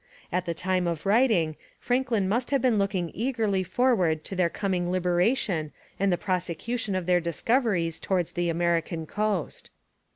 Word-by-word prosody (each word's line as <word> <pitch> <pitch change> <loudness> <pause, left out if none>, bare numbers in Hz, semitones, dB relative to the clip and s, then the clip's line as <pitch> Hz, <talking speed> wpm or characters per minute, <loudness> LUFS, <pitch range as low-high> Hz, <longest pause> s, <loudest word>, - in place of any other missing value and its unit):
At 180 0 0
the 170 -1 -2
time 180 +1 0
of 170 0 -3
writing, 200 -8 +3 0.2
Franklin 245 -6 0
must 235 +5 0
have 275 - +2
been 235 -4 +2
looking 195 -4 -1
eagerly 220 -5 0
forward 185 -5 +1
to 195 - -4
their 180 -2 +2
coming 180 -2 -1
liberation 180 - +1 0.3
and 195 0 +2
the 175 - +2
prosecution 185 +5 -2
of 185 -2 -2
their 180 0 +3
discoveries 175 - 0
towards 180 -4 -1
the 175 -1 -1
American 170 -1 0
coast. 205 -2 -2
185 Hz, 155 wpm, -27 LUFS, 170-220 Hz, 0.3 s, writing